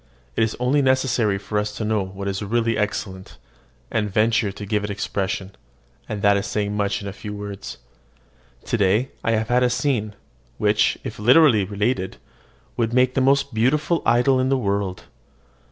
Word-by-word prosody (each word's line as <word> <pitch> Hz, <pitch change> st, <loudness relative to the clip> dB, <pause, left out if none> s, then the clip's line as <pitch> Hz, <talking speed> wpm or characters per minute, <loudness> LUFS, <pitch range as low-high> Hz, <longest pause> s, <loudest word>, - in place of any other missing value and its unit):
It -, -, 0 dB
is 110 Hz, 0 st, 0 dB
only 130 Hz, +4 st, +2 dB
necessary 130 Hz, -6 st, +2 dB
for 105 Hz, +1 st, -2 dB
us 105 Hz, 0 st, -2 dB
to 110 Hz, -, -3 dB
know 110 Hz, -1 st, +1 dB
what 95 Hz, +1 st, -7 dB
is 95 Hz, 0 st, -2 dB
really 115 Hz, +2 st, 0 dB
excellent, 95 Hz, -3 st, -4 dB, 0.5 s
and 105 Hz, -2 st, 0 dB
venture 110 Hz, 0 st, +2 dB
to 100 Hz, +1 st, -8 dB
give 105 Hz, +1 st, -1 dB
it 105 Hz, -, -3 dB
expression; 100 Hz, -1 st, -3 dB, 0.6 s
and 105 Hz, -2 st, -4 dB
that 100 Hz, -1 st, +5 dB
is 100 Hz, -, -2 dB
saying 105 Hz, -1 st, -2 dB
much 100 Hz, 0 st, -1 dB
in 100 Hz, -, -5 dB
few 105 Hz, +1 st, -7 dB
words. 100 Hz, -1 st, -7 dB, 0.9 s
To -, -, 0 dB
day 105 Hz, +6 st, +2 dB
I 115 Hz, -, +1 dB
have 110 Hz, 0 st, -1 dB
had 125 Hz, +1 st, +3 dB
a 125 Hz, -, +3 dB
scene, 115 Hz, -5 st, -1 dB, 0.4 s
which, 105 Hz, 0 st, +2 dB
if 110 Hz, -, -7 dB
literally 120 Hz, -2 st, +5 dB
related, 100 Hz, 0 st, -2 dB, 0.6 s
would, 115 Hz, -1 st, 0 dB
make 125 Hz, 0 st, +3 dB
the 135 Hz, -, +1 dB
most 140 Hz, 0 st, +2 dB
beautiful 145 Hz, +9 st, +1 dB
idyl 125 Hz, +2 st, +3 dB
in 130 Hz, 0 st, +1 dB
the 135 Hz, -, +2 dB
world. 100 Hz, -5 st, -2 dB
105 Hz, 175 wpm, -22 LUFS, 100-125 Hz, 0.9 s, that